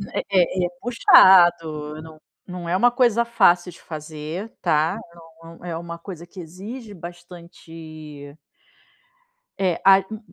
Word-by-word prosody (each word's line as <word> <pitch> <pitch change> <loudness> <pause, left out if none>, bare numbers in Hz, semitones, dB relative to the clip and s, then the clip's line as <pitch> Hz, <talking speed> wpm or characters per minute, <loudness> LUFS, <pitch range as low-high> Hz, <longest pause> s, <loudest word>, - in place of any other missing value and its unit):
É - - 0 0.4
é - - +2
é 175 - -3
puxado, 170 -9 +4
não 160 -1 -13 0.3
não 180 -2 -7
é 175 - 0
uma 240 +6 +3
coisa 240 -2 +2
fácil 180 -6 +2
de - - -17
fazer, 155 +5 -7
tá. 155 +2 +1 0.5
É - - -13
um 165 +1 -14
é 170 -2 -4
uma 170 0 -8
coisa 170 -1 -10
que 185 +2 -14
exige 205 +7 -9
bastante 165 -4 -12 1.2
eh, 185 -3 -1
a 195 0 +7
u 215 - -6
175 Hz, 140 wpm, -22 LUFS, 160-190 Hz, 1.2 s, a